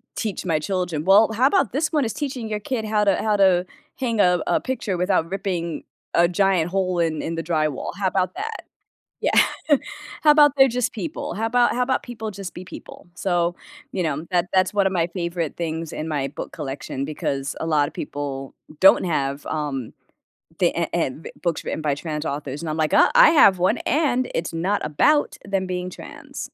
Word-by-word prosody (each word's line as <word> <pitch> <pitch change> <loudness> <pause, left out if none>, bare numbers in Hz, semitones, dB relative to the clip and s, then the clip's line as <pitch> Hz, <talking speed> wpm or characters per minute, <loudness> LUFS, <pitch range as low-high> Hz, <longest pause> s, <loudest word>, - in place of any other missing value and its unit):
teach 215 -5 -3
my 165 -3 +1
children." 175 -3 -2
"Well, 205 +4 +6
how 250 +5 +4
about 290 - +2
this 310 +5 0
one 300 -2 +2
is 225 - -2
teaching 255 -4 -4
your 210 -1 -2
kid 225 +2 -3
how 210 -1 +1
to 200 -2 +4
how 215 -1 +1
to 185 -2 +4 0.3
hang 235 -4 -1
a 180 -3 +4
a - - +2
picture 235 -8 -3
without 180 -2 +1
ripping 180 -4 -3 0.3
a 170 0 +5
giant 180 -2 +2
hole 185 -2 0
in 160 -2 0
in 165 - -3
the 165 - -3
drywall, 155 -4 -1
how 195 -1 0
about 185 - 0
that?" 440 +3 -5 0.6
Yeah. - - +1 0.9
"How 300 - +7
about 295 -2 +6
they're 270 0 +7
just 245 0 -1
people? 295 +8 -5
How 225 +2 -1
about 245 +1 +3
how 250 - 0
about 260 +1 0
people 220 -3 -6
just 195 -1 -7
be 180 - -8
people?" - - -11
So, 175 -2 0 0.4
you 190 - -2
know, 155 0 -2
that 175 0 +1
that's 185 0 +3
one 200 -2 +3
of 190 - -2
my 170 -2 +1
favorite 170 -3 -3
things 165 -1 -4
in 155 - -4
my 145 -4 -1
book - - -7
collection 135 -2 -5
because 140 -2 -3
a - - -3
lotta 150 -3 +2
people 140 -2 -5 0.3
don't 190 - +7
have, 140 -4 -1
um, 140 -6 -3 0.7
the - - +3
eh - - +1
em 135 +5 -1 0.2
books 170 -3 -1
written 155 - -3
by 145 -2 0
trans 150 0 -5
authors, 140 -1 -4
and 165 - -4
I'm 155 - -3
like, 155 -1 0
"Uh, - - +5
I - - +8
have 200 - +6
one, 180 - +2
and 255 -3 +1
it's 165 0 -2
not 185 +5 0
about 290 - +2
them 195 -1 -1
being 180 0 -3
trans." - - -9
180 Hz, 200 wpm, -23 LUFS, 160-220 Hz, 0.9 s, I